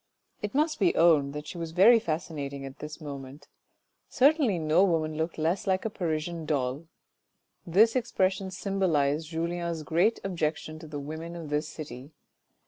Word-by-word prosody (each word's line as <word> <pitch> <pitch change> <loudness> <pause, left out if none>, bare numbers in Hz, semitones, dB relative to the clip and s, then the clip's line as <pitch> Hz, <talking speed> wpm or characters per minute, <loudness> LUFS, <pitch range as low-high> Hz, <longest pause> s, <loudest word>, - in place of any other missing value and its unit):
It 210 +4 -4
must 305 +1 +1
be 350 - +3
owned 150 -5 +4
that 150 0 -5
she 170 - -7
was 165 -1 -5
very 220 +7 +7
fascinating 150 -6 -4
at 135 +1 -10
this 150 +1 -7
moment, 140 -2 -8 0.6
certainly 275 - +3
no 155 +3 +3
woman 160 -4 +1
looked 160 +2 -2
less 165 +5 0
like 190 +1 +1
a 220 - -1
Parisian 165 -2 -3
doll 140 +2 -1 0.8
(this 215 +8 +5
expression 195 -6 0
symbolised 165 -6 0
Julien's 170 0 -2
great 170 +9 +2
ob 190 -2 -3
jection 155 0 -2
to 160 - -10
the 150 -1 -6
women 160 +4 -6
of 165 -3 -7
this 150 +1 0
city). 135 -3 -8
165 Hz, 160 wpm, -28 LUFS, 150-190 Hz, 0.8 s, very